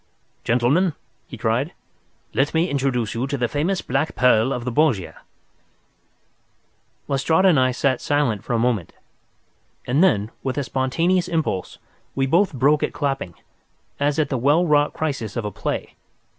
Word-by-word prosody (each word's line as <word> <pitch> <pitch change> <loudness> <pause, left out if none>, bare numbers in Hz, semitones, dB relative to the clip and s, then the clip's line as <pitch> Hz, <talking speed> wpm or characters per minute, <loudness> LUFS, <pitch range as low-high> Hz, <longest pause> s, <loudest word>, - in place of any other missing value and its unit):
"Gentlemen," 135 +10 +2 0.3
he 125 - -9
cried, 115 +8 -1 0.6
"let 145 +4 0
me 165 +3 +1
introduce 130 -5 -1
you 120 +4 -2
to 140 0 -2
the 120 -2 0
famous 165 +9 -1
black 135 +5 -1
pearl 125 -1 +3
of 125 -3 -3
the 125 - -2
Borgias." 120 - +1 1.9
Lestrade 160 +6 +2
and 175 -7 +5
I 130 0 +3
sat 130 0 0
silent 125 -8 0
for 120 - -3
a - - +2
moment, 115 -7 0 0.9
and 140 +8 +2
then, 110 - +2
with 130 0 -3
a 145 - 0
spontaneous 165 +8 0
impulse, 155 - -2 0.4
we 135 - +1
both 170 +8 +2
broke 145 +2 +2
at - - -1
clapping, 135 - -3 0.6
as 145 0 +1
at 155 -3 +1
the 130 - -1
well 145 +8 +3
wrought 150 -2 +2
crisis 140 -9 -3
of 115 - -3
a 105 - -3
play. - - -4
135 Hz, 155 wpm, -22 LUFS, 120-150 Hz, 1.9 s, and